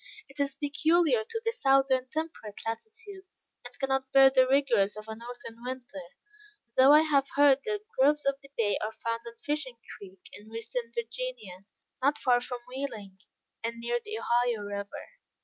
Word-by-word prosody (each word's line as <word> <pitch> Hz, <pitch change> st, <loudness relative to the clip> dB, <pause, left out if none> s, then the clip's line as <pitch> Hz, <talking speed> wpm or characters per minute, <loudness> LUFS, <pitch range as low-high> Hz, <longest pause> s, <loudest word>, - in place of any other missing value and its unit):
It 275 Hz, +1 st, -14 dB
is 280 Hz, -1 st, 0 dB
peculiar 290 Hz, -2 st, +2 dB
to 455 Hz, -, -5 dB
the 455 Hz, -, +2 dB
southern 270 Hz, -, +2 dB
temperate 310 Hz, -10 st, -5 dB
latitudes, 390 Hz, -, -8 dB
and 245 Hz, 0 st, -11 dB
cannot 265 Hz, 0 st, -1 dB
bear 270 Hz, 0 st, +7 dB
the 260 Hz, -1 st, +5 dB
rigors 240 Hz, -7 st, +2 dB
of 215 Hz, +1 st, -9 dB
a 220 Hz, -, -5 dB
northern 235 Hz, 0 st, -10 dB
winter; 250 Hz, -6 st, -6 dB, 0.7 s
though 260 Hz, +2 st, +7 dB
I 300 Hz, +1 st, +8 dB
have 285 Hz, -3 st, +2 dB
heard 280 Hz, -1 st, +6 dB
that 420 Hz, -2 st, -2 dB, 0.2 s
groves 295 Hz, +2 st, +4 dB
of 275 Hz, 0 st, 0 dB
the 275 Hz, -, -15 dB
Bay 205 Hz, -3 st, +1 dB
are 215 Hz, -, -2 dB
found 230 Hz, 0 st, -3 dB
on 235 Hz, 0 st, -10 dB
Fishing 285 Hz, -2 st, -3 dB, 0.2 s
Creek, 190 Hz, -2 st, -14 dB
in 210 Hz, +1 st, -12 dB
Western 230 Hz, +1 st, -5 dB
Virginia, 230 Hz, -5 st, -5 dB, 0.4 s
not 280 Hz, +3 st, +2 dB
far 245 Hz, -1 st, +3 dB
from 245 Hz, 0 st, -5 dB
Wheeling, 235 Hz, -8 st, -6 dB, 0.4 s
and 230 Hz, +1 st, -2 dB
near 240 Hz, +1 st, -1 dB
the 430 Hz, +1 st, -5 dB
Ohio 240 Hz, -, +1 dB
river. 200 Hz, 0 st, -6 dB
255 Hz, 165 wpm, -29 LUFS, 230-280 Hz, 0.7 s, I